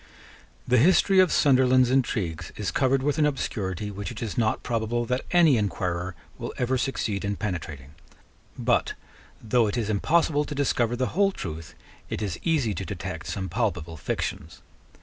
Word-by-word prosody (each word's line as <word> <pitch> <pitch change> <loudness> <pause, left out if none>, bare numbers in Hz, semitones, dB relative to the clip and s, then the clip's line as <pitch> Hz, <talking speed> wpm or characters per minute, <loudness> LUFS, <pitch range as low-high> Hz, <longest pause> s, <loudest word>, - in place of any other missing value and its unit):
The 125 -1 +4
history 190 - +5
of 185 -2 +5
Sunderland's 130 -2 +4
intrigues 105 - -1
is 100 -5 -2
covered 130 +6 +2
with 145 +2 0
an 150 - +4
obscurity 105 - -3
which 100 0 -5
it 115 - -8
is 110 - -4
not 110 -2 0
probable 120 0 -1
that 125 +2 -1
any 170 -7 +5
inquirer 90 -3 -2 0.2
will - - -5
ever 125 +1 0
succeed 120 -6 -1
in 100 0 -1
penetrating: 80 -9 -5 0.6
but, - - +1 0.5
though 115 +1 +2
it 105 - -2
is 110 -3 -1
impossible 150 +7 +2
to 150 - -6
discover 120 -4 +1
the 130 +1 -1
whole 195 +3 +3
truth, 80 - -7 0.3
it - - -3
is 100 -4 -3
easy 145 -10 +1
to 95 - -4
detect 90 - -6
some 95 -1 -3
palpable 90 -8 -2
fictions. 80 +2 -4
115 Hz, 165 wpm, -26 LUFS, 95-135 Hz, 0.6 s, history